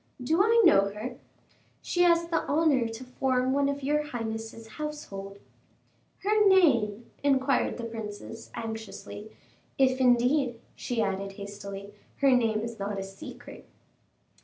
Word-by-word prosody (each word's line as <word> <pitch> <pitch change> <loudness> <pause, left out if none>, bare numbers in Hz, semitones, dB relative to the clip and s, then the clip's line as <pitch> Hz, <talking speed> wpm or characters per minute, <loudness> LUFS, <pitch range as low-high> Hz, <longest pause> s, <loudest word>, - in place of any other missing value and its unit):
"Do 315 +8 +2
I 455 +3 +5
know 200 0 +6
her?" 235 +5 -7 0.6
"She 355 - 0
has 340 -1 +4
the 335 - +1
honor 290 -5 +3
to 225 +2 -7
form 255 0 0
one 280 0 +2
of 280 0 -3
your 295 +2 +2
highness's 225 -4 -5
household." 220 -8 -7 0.9
"Her 420 +1 +4
name?" 240 - +3
inquired 270 -2 +2
the 240 - -6
princess, 225 0 -7
anxiously; 220 -1 -7 0.5
"if 260 -1 +3
indeed," 250 0 +3 0.2
she 235 -3 -1
added, 195 0 -2
hastily, 200 0 -8 0.2
"her 275 -1 +3
name 225 -4 +2
is 230 -1 -6
not 200 0 -3
a 195 - -3
secret." 195 0 -11
240 Hz, 135 wpm, -28 LUFS, 210-280 Hz, 0.9 s, know